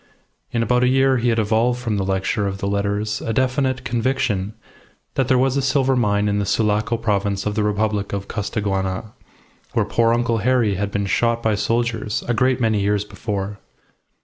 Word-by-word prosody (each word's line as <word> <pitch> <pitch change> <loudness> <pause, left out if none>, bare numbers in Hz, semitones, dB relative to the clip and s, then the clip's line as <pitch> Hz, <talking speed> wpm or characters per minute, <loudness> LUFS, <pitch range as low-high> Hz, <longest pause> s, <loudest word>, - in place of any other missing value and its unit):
In 115 -1 0
about 125 +2 +2
a - - +4
year 135 +1 +3
he 120 0 +1
had 115 - +1
evolved 115 +3 +1
from 115 -4 -2
the 100 - 0
lecture 95 +2 0
of 95 0 -3
the 100 - -4
letters 100 +1 -1
a 115 - -2
definite 130 +1 0
conviction 115 -4 -1 0.6
that 135 - 0
there 130 -1 +3
was 130 +1 +2
a 140 - +1
silver 135 0 +2
mine 105 -4 +1
in 105 0 +1
the 100 - -1
Sulaco 105 +2 +1
province 100 -3 -1
of 105 - -1
the 105 - 0
Republic 105 -1 0
of 100 0 -4
Costaguana, 100 -1 -2 0.6
where - - +2
poor 115 -1 +2
Uncle 120 -1 +1
Harry 120 -1 +2
had 100 +2 -2
been 100 0 -2
shot 115 +4 +1
by 110 - +2
soldiers 115 0 -1
a 120 - +1
great 130 +3 +2
many 110 -3 +2
years 105 0 +1
before. 105 -2 -4
110 Hz, 190 wpm, -21 LUFS, 100-120 Hz, 0.6 s, a